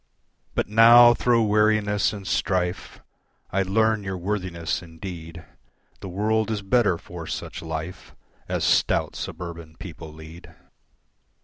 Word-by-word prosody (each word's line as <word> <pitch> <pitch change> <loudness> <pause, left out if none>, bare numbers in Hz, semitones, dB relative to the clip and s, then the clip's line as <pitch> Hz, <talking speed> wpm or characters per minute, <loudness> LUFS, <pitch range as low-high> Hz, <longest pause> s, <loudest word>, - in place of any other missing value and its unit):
But - - 0
now 120 +3 +8
thro' 120 -1 +2
weariness 105 -1 +2
and 100 -2 -8
strife 90 +2 -2 0.5
I 100 - +1
learn 110 +2 +1
your 95 -1 -4
worthiness 90 -4 -3
indeed, 80 -1 -9 0.5
The 95 - -8
world 110 +3 0
is 105 -2 -3
better 105 -4 +2
for 85 -1 -9
such - - -6
life 80 +2 -7 0.3
As - - -1
stout - - +1
suburban 85 -2 -7
people 80 - -9
lead. 80 +2 -13
95 Hz, 120 wpm, -24 LUFS, 85-105 Hz, 0.5 s, now